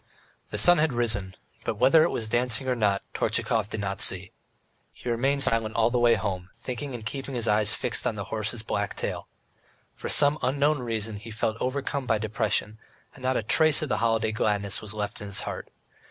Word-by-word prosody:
The - - -4
sun 175 -1 +6
had 155 -3 +2
risen, 105 -6 -1 0.3
but - - -2
whether 130 +8 +5
it 170 - +2
was 110 - -3
dancing 120 +2 +1
or 130 - +2
not 105 -4 +1
Tortchakov - - 0
did 110 -1 -4
not 100 +1 -2
see. 95 -5 +4 0.6
He 125 - -5
remained 135 +4 +1
silent 115 -1 +1
all 115 +1 +3
the 125 - +1
way 120 -1 +5
home, 90 -1 -3
thinking 130 +1 -5
and 110 -3 -8
keeping 135 +3 -5
his 120 -1 +1
eyes 105 0 +3
fixed - - -1
on 115 - -1
the 100 - -4
horse's 110 +1 -2
black 105 -2 -2
tail. - - -4 0.7
For - - -6
some 145 +1 +5
unknown 140 +3 +1
reason 110 -3 -3
he 115 +3 -10
felt 110 0 -2
overcome 135 0 -2
by 110 - +2
depression, 110 0 -1 0.3
and 135 - -15
not 130 0 +1
a - - -1
trace 155 +7 +3
of 150 - -4
the 110 - +1
holiday 110 -1 +1
gladness 105 -2 -1
was 110 0 -9
left 105 0 -4
in 105 - -6
his 100 - -4
heart. - - -6
115 Hz, 205 wpm, -26 LUFS, 105-130 Hz, 0.7 s, sun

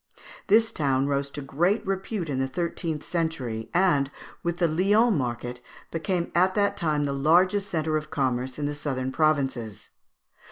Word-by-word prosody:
This 225 +2 +4
town 135 -3 +1
rose 140 0 0
to 145 0 -6
great 175 +10 +1
repute 195 -1 -2
in 135 -3 -2
the 135 - +1
thirteenth 165 0 -3
century, 130 -10 -2
and, 170 -7 +3 0.3
with 170 0 -2
the 175 - +3
Lyons 205 +8 +3
market, 120 -2 -3 0.3
became 170 +2 -1
at 185 +2 +3
that 200 -1 +2
time 150 -4 0
the 140 - -1
largest 180 +8 +3
centre 155 -2 0
of 155 0 -5
commerce 130 -4 -1
in 150 - -2
the 145 - -1
southern 135 -3 -3
provinces. 135 -8 0
155 Hz, 160 wpm, -26 LUFS, 135-180 Hz, 0.3 s, This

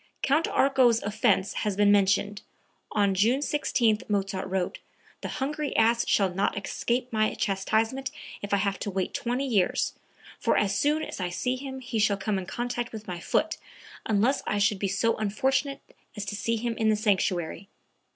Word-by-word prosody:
Count 300 +5 +3
Arco's 255 -4 +4
offence 205 -2 +1
has 210 -3 -1
been 205 0 +5
mentioned. 200 0 +2 0.5
On 200 -2 +2
June 225 +8 +3
16 235 -8 +1
Mozart 195 -2 -1
wrote: 185 -1 -2 0.4
"The - - -4
hungry 295 +2 -3
ass 230 +1 +3
shall 195 -3 +2
not 195 +2 0
escape 240 +5 -2
my 215 0 +1
chastisement 220 +7 0 0.3
if 205 - -6
I 200 - +4
have 200 -1 -1
to - - -3
wait 190 -1 -2
twenty 245 +3 -1
years; 205 -9 +1 0.5
for - - +2
as 200 -1 +1
soon 300 +7 +1
as - - -6
I 180 -1 -1
see 220 +9 -1
him 265 0 -7
he 235 -2 -3
shall 205 -1 +3
come 200 0 -1
in 180 - -7
contact 240 +1 -3
with 220 -1 -8
my 180 -2 -4
foot, - - 0 0.5
unless 225 +6 +2
I 210 - 0
should 205 0 +2
be 200 - 0
so 200 +4 +1
unfortunate 265 +6 0 0.4
as 210 - -4
to 205 - -4
see 230 +2 -1
him 230 +1 -2
in 220 -1 +2
the 215 - +4
sanctuary." 195 -3 0
215 Hz, 180 wpm, -27 LUFS, 195-245 Hz, 0.5 s, been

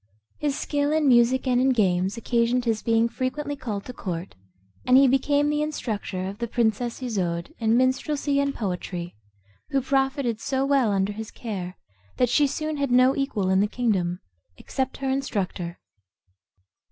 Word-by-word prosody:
His 295 -1 -1
skill 290 -1 0
in 310 -1 +2
music 250 +1 +4
and 250 -1 +2
in 265 - +3
games 195 -4 +1
occasioned 240 +1 +1
his 225 -2 0
being 230 0 +2
frequently 265 +5 -3
called 215 -7 -5
to 250 - -7
court, 180 -5 -5 0.5
and 255 +1 +5
he 275 0 +7
became 285 +3 +2
the 295 0 +1
instructor 215 -10 -3
of 195 +3 -6
the 235 - -2
princess 235 +2 -1
Isoude 175 -8 -2
in 225 0 +3
minstrelsy 280 +3 +1
and 280 0 0
poetry, 180 -3 -4 0.6
who 275 - +2
profited 270 -3 0
so 270 -1 0
well 275 -6 +3
under 195 +1 0
his 220 +1 -6
care, 190 -6 -6 0.4
that 250 - +3
she 285 +4 +4
soon 310 +2 -3
had 280 -1 0
no 255 +2 +5
equal 215 -9 -1
in 190 - +4
the 205 - +3
kingdom, 195 -7 -1 0.4
except 265 -1 -3
her 270 -1 -2
instructor. 195 -10 -2
245 Hz, 165 wpm, -25 LUFS, 205-275 Hz, 0.6 s, he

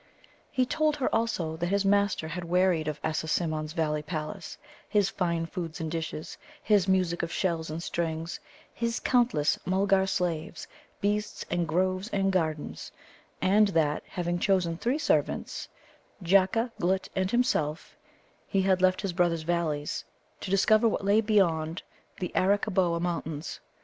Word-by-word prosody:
He 255 - +1
told 305 +4 +1
her, 275 - -1
also, 205 -8 0
that 175 +1 -1
his 200 +2 +1
master 200 -5 +2
had 175 +2 -4
wearied 175 -2 +2
of 150 -1 -3
Assasimmon's 155 -1 -1
valley 150 -2 0
palace, 155 0 -5 0.3
his 205 -3 +2
fine 170 -3 -1
food 165 0 -5
and 160 -1 -3
dishes, 160 -1 -5 0.2
his 205 -3 +3
music 185 -2 +2
of 170 - -3
shells 165 -4 -1
and 160 +2 -4
strings, 165 -1 -3 0.3
his 235 0 -1
countless 235 - +2
Mulgar 190 +1 +2
slaves, 170 -3 -2 0.3
beasts, 210 +1 -1
and 175 -1 0
groves 185 +4 0
and 195 -3 +1
gardens; 160 -5 -2 0.5
and 205 +3 +5
that, 160 -5 +1
having 175 -1 -2
chosen 180 -3 +2
three 245 - 0
servants, 310 - 0 0.6
Jacca, 195 +6 +3
Glutt, 185 +2 +1
and 190 0 +1
himself, 170 - 0 0.5
he 195 -1 +1
had 190 -1 +2
left 185 0 +3
his 195 -3 -2
brother's 170 -2 +1
valleys, 155 -3 -1 0.4
to - - -6
discover 215 +4 +4
what 210 - -1
lay 205 +2 +4
beyond 170 -7 +1 0.4
the 180 -2 -3
Arakkaboa 190 -3 +2
Mountains. 165 -2 -3
180 Hz, 145 wpm, -28 LUFS, 165-195 Hz, 0.6 s, and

